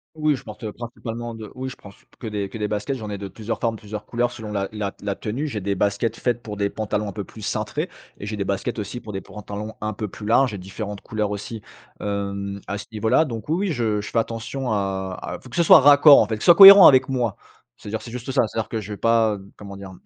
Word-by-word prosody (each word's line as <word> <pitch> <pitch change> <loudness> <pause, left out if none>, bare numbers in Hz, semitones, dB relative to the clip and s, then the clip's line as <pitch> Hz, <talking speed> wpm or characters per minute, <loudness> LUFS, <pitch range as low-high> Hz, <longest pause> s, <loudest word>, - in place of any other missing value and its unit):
Oui 155 -2 +1
je - - -12
porte, 105 +2 -11
heu, 105 - -4
principalement 115 0 -6
de 110 -2 -9
oui 130 +1 -5
je - - -10
prends 100 - -13
c 100 - -19
p - - -29
que 120 - -6
des 105 -3 -3
que 110 - -7
des 105 -1 -2
baskets 105 +6 -2
j'en 110 -2 -7
ai 105 - -4
de 100 0 -7
plusieurs 110 +3 -5
formes 115 -1 0
plusieurs 105 0 -8
couleurs 120 0 -1
selon 110 -3 -8
la 100 -1 -2
la 105 -2 -4
t - - -27
la 100 - 0
tenue. 115 +10 -4
J'ai 105 -7 -5
des 100 +1 -1
baskets 100 +4 0
faites 120 -1 -1
pour 105 -3 -7
des 100 -1 +1
pantalons 105 0 -3
un - - -5
peu 105 - -4
plus 110 - -13
cintrés 105 - -3 0.3
et 100 - -7
j'ai 105 +1 -4
des 100 - -2
baskets 100 +5 -3
aussi 110 +4 -5
pour 105 -3 -9
des 95 - -4
pantalons 105 +1 -7
un 105 0 -3
peu 105 +1 -4
plus 105 +2 -9
larges 120 +2 +3
et 100 - -5
différentes 100 +2 -6
couleurs 105 -2 -3
aussi, 105 +2 -6 0.4
hem, 100 -1 -3
à 100 - -3
ce 100 - -7
niveau-là, 110 +8 +2
donc 115 -5 -6
oui, 180 +6 0
oui, - - +1
je 110 -6 -1
je - - -7
fais - - 0
attention 115 +3 -3
à 95 -2 -2
à - - -5
faut - - -14
que 120 - -9
ce 170 - +4
soit 165 - +8
raccord 145 +1 +8
en - - +3
fait, 110 - -2
que 105 - -10
ce - - -3
soit 175 - +8
cohérent 195 0 +12
avec 130 -1 +6
moi. 125 -6 -1 0.4
C'est-à-dire 110 +1 -5
c'est 115 - -9
juste 125 +1 -6
ça. 130 -4 +3
C'est-à-dire 110 +1 -4
que 110 - -3
je 105 +1 -7
vais 100 - -6
pas, 115 -2 +3
heu, 100 0 -13
comment 100 -1 -10
dire? 95 -1 -9
110 Hz, 280 wpm, -23 LUFS, 100-120 Hz, 0.4 s, cohérent